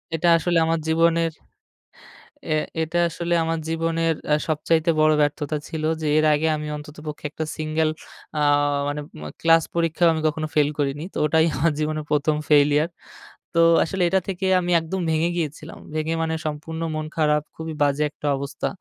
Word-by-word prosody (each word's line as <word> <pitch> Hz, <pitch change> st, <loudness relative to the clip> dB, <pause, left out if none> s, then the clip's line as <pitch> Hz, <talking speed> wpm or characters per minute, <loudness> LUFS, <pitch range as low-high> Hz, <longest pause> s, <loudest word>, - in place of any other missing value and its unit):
এটা 170 Hz, +2 st, +2 dB
আসলে 175 Hz, +1 st, +1 dB
আমার 165 Hz, 0 st, +1 dB
জীবনের 165 Hz, 0 st, +2 dB, 1.2 s
এ -, -, +2 dB, 0.3 s
এটা 165 Hz, +2 st, -1 dB
আসলে 170 Hz, +1 st, -3 dB
আমার 165 Hz, 0 st, -1 dB
জীবনের 165 Hz, 0 st, 0 dB
অ্যাঁ 150 Hz, 0 st, +3 dB
সবচাইতে 160 Hz, +2 st, +1 dB
বড় 155 Hz, 0 st, +5 dB
ব্যর্থতা 145 Hz, +1 st, 0 dB
ছিল। 160 Hz, -2 st, -4 dB, 0.2 s
যে, 155 Hz, -, -1 dB
এর 155 Hz, -, +3 dB
আগে 150 Hz, +2 st, +1 dB
আমি 150 Hz, 0 st, -5 dB
অন্ততপক্ষে 150 Hz, 0 st, -9 dB
১ -, -, -31 dB
টা 160 Hz, -, 0 dB
সিঙ্গল 155 Hz, 0 st, 0 dB, 0.5 s
আ -, -, +1 dB, 0.5 s
মানে 145 Hz, +1 st, -2 dB, 0.3 s
অ -, -, -6 dB
ক্লাস 165 Hz, 0 st, +5 dB
পরীক্ষাও 165 Hz, 0 st, +2 dB
আমি 160 Hz, -, -2 dB
কখনো 155 Hz, 0 st, -2 dB
ফেইল 150 Hz, -1 st, +4 dB
করিনি। 145 Hz, +2 st, -1 dB
তো -, -, -6 dB
ওটাই 160 Hz, +2 st, +3 dB
আমার 160 Hz, +4 st, +2 dB
জীবনের 155 Hz, 0 st, -2 dB
১ম 150 Hz, +1 st, +2 dB
ফেইলিয়ার। 150 Hz, +1 st, +4 dB, 0.7 s
তো 170 Hz, -, +3 dB, 0.3 s
আসলে 185 Hz, +2 st, -1 dB
এটা 190 Hz, -, +3 dB
থেকে 190 Hz, 0 st, -3 dB, 0.2 s
আমি 175 Hz, 0 st, -2 dB
একদম 175 Hz, +4 st, -4 dB
ভেঙে 160 Hz, +2 st, +1 dB
গিয়েছিলাম। 155 Hz, 0 st, -5 dB, 0.2 s
ভেঙে 155 Hz, +1 st, -1 dB
মানে 160 Hz, 0 st, -1 dB
সম্পূর্ণ 160 Hz, +2 st, -5 dB
মন 155 Hz, -, -3 dB
খারাপ, 150 Hz, -1 st, +2 dB
খুবই 160 Hz, 0 st, -6 dB
বাজে 145 Hz, +1 st, +1 dB
একটা 150 Hz, -, -6 dB
অবস্থা। 140 Hz, +1 st, -4 dB
160 Hz, 170 wpm, -23 LUFS, 150-165 Hz, 1.2 s, বড়